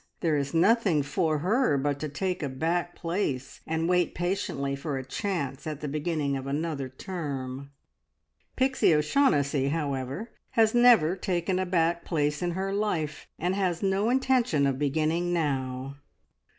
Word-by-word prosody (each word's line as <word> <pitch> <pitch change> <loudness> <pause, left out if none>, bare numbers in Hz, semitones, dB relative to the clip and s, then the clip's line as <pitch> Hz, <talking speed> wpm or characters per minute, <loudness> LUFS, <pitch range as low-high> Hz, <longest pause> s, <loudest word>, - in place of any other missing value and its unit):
There 160 -3 +2
is 140 -1 -1
nothing 180 -3 +3
for 155 +2 0
her 225 - +3
but 140 +1 -1
to 155 - -3
take 180 +5 -2
a 145 - -2
back 170 +6 -1
place, 165 -7 -3
and 160 +1 0
wait 180 -1 +2
patiently 175 -6 -1
for 140 0 -3
a 130 - -5
chance 145 - -3
at 150 -2 -4
the 150 - -3
beginning 150 -1 -1
of 135 0 -5
another 145 -2 -2
term. 140 -4 -5 0.9
Pixie 260 -10 +3
O'Shaughnessy, 150 - +2
however, 140 - -3 0.3
has 220 -1 +5
never 240 -9 +6
taken 185 0 -1
a 185 - -1
back 170 -1 +1
place 150 -2 0
in 175 -1 -1
her 190 +2 -2
life, 180 -8 -2
and 180 +2 0
has 185 -2 -1
no 195 +3 +2
intention 250 - +2
of 135 -1 0
beginning 155 +4 0
now. 135 -4 -2
160 Hz, 150 wpm, -27 LUFS, 140-185 Hz, 0.9 s, never